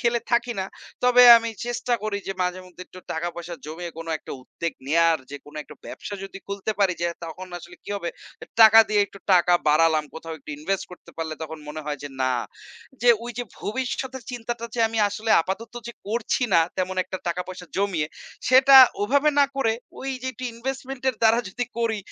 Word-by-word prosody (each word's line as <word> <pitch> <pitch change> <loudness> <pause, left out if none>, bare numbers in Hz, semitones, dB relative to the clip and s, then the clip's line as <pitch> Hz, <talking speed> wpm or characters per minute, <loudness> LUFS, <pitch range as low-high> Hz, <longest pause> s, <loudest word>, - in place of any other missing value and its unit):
খেলে 235 0 +1
থাকি 240 0 +2
না। - - -1 0.4
তবে 250 0 +6
আমি 230 0 -1 0.2
চেষ্টা 240 0 -2
করি 215 -1 -2
যে 195 - -2
মাঝে 180 +1 -2
মধ্যে 180 0 -11
একটু 185 - -13
টাকা-পয়সা 175 +1 -4
জমিয়ে, 170 +3 -6
কোন 165 - -7
একটা - - -9
উদ্বেগ 165 +5 -4 0.2
নেওয়ার 165 +1 +4
যে 145 - -5
কোন 145 - -15
একটা - - -14
ব্যবসা 205 - -7
যদি 195 - -9
খুলতে 200 +2 -3
পারি। 195 -3 +3
যে - - +2 0.2
তখন 175 +3 -8
আসলে 175 +1 -13
কি - - -8
হবে, 175 -4 -4 0.4
এ - - -25 0.2
টাকা 220 0 +10
দিয়ে 210 -1 +3
একটু 200 - -14
টাকা 180 -1 +5 0.2
বাড়ালাম, 155 0 +4
কোথাও 160 0 -7
একটু 145 - -11
ইনভেস্ট 195 +6 -2
করতে 180 - -13
পারলে 160 -1 -3
তখন 160 0 -6
মনে 155 +1 -5
হয় 145 -1 -3
যে 145 - -5
না। 130 - +2 0.7
যে 245 - +7
ওই 240 - -5
যে 245 - -2 0.2
ভবিষ্যতের 260 +2 -3
চিন্তাটা 240 -1 -5
যে 235 - -1
আমি 225 0 -3
আসলে 220 +2 -4
আপাতত 220 +7 -5 0.2
যে - - -6
করছি 225 +4 -1
না 165 - +7 0.2
তেমন 185 0 -2
একটা 185 - -6
টাকা-পয়সা 180 +1 -5
জমিয়ে। 190 -6 0 0.4
সেটা 265 +1 +8 0.3
ওভাবে 285 +7 +3
না - - +7
করে 225 -5 +2 0.3
ওই 270 - -5
যে - - -4
একটু 255 - -8
ইনভেস্টমেন্ট 265 +2 -5
এর 245 - -15
দ্বারা 225 +1 +5
যদি 245 +6 -3
করি, 225 -2 0
200 Hz, 200 wpm, -24 LUFS, 170-235 Hz, 0.7 s, টাকা